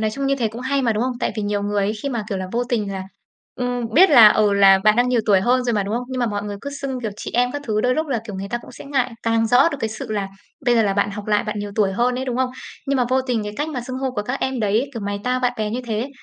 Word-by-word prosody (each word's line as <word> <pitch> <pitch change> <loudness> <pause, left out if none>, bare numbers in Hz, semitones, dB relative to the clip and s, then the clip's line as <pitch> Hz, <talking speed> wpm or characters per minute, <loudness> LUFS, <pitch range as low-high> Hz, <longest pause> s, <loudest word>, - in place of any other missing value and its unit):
nói 215 -1 0
chung 275 +5 -3
như 275 - +2
thế 230 -4 0
cũng 230 +3 -9
hay 275 +2 0
mà, 230 -3 +2
đúng 215 - -1
không? 255 0 0
Tại - - 0
vì 215 - -2
nhiều 205 0 -1
người 205 0 0
ấy, 210 - 0
khi 280 - -1
mà, 235 -5 -2
kiểu 195 - -2
là, 185 - -4
vô 240 +1 0
tình 215 -5 -1
là 190 - -4 0.5
ừm, 245 -2 -3
biết 370 +2 +7
là 230 -6 +9
ừ, 210 -1 +3
là 195 -1 +6
bạn 215 0 +5
đang 245 +1 +3
nhiều 245 -2 +2
tuổi 200 -3 +5
hơn 250 +5 +2
rồi 240 - 0
mà, 205 - +1
đúng 200 +3 -3
không? 245 +1 -2
Nhưng 255 -1 -4
mà 240 - +2
mọi 205 -2 -2
người 205 -1 -5
cứ 280 - -6
xưng, 275 -2 -4
kiểu, 220 -3 -3
chị - - -6
em 245 +1 +2
các 290 0 -5
thứ, 215 -3 0
đôi 250 +2 +2
lúc 315 +2 -1
là, 250 -5 -1
kiểu, 210 - -7
người 195 +1 -5
ta 240 - -1
cũng - - -13
sẽ - - -11
ngại, 265 -3 -1
càng 225 0 +2
rõ 250 +7 +5
được 285 - -5
cái 225 - -1
sự 220 +1 -6
là 200 -2 -2 0.4
bây 245 -2 +3
giờ 230 - +4
là 200 -2 +1
bạn 200 0 +1
học 205 0 -7
lại, 210 0 +1
bạn 215 -1 -3
nhiều 205 0 -4
tuổi 200 -3 +2
hơn 245 +5 +1
ấy, 260 +1 -3
đúng 250 -2 -3
không? 260 -1 0 0.4
Nhưng 275 - +1
mà 250 - +2
vô 260 - +3
tình 245 -4 -1
cái 210 - -5
cách 295 +2 -2
mà 265 -5 -4
xưng 255 +2 -6
hô 265 -1 -1
của 210 -4 -3
các 250 +5 -4
em 260 -2 -1
đấy, 220 +6 +1
kiểu, 230 - -5
mày 205 0 -3
tao, 255 0 0
bạn 250 -1 +1
bè 215 -1 -2
như 245 +3 -2
thế 225 +3 -2
235 Hz, 350 wpm, -21 LUFS, 210-255 Hz, 0.5 s, là